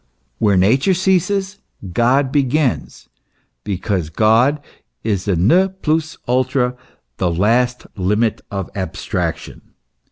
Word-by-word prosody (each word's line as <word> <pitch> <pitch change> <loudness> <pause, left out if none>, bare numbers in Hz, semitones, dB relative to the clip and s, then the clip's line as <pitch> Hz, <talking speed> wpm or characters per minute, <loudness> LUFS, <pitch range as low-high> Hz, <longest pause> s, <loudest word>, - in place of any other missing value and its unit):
"Where 100 -3 +3
Nature 130 - +3
ceases, 190 +2 0 0.3
God 130 +6 +2
begins," 140 -1 0 0.6
because 95 -4 -2
God 115 - +3 0.4
is 100 -4 -1
the 100 -3 +1
ne 145 - +4
plus 160 -4 -2
ultra, 125 0 +1 0.4
the 90 - 0
last 115 +8 +1
limit 105 +4 0
of 95 -3 -5
abstraction. 95 -2 -4
125 Hz, 100 wpm, -18 LUFS, 100-150 Hz, 0.6 s, ne